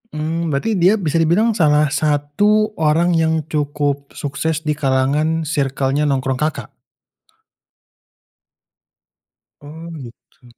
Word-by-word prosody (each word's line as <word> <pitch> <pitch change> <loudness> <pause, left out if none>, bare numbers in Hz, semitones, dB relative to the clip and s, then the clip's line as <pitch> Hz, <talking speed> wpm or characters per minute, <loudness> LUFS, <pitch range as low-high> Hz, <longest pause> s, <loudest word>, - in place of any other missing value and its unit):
Mmm, 165 +2 -2
berarti 140 +11 -1
dia 185 +5 +5
bisa 165 -5 -1
dibilang 175 +8 +3
salah 150 -7 +2
satu 155 +10 +1
orang 160 +3 +2
yang 160 -1 +1
cukup 145 -1 -2
sukses 150 +2 -3
di 150 - -1
kalangan 150 +3 0
circle-nya 140 -1 -1
nongkrong 130 -2 -1
Kakak? 155 +1 -3 2.9
Oh, 160 +3 -10
begitu. 125 -4 -14
150 Hz, 100 wpm, -18 LUFS, 145-165 Hz, 2.9 s, dia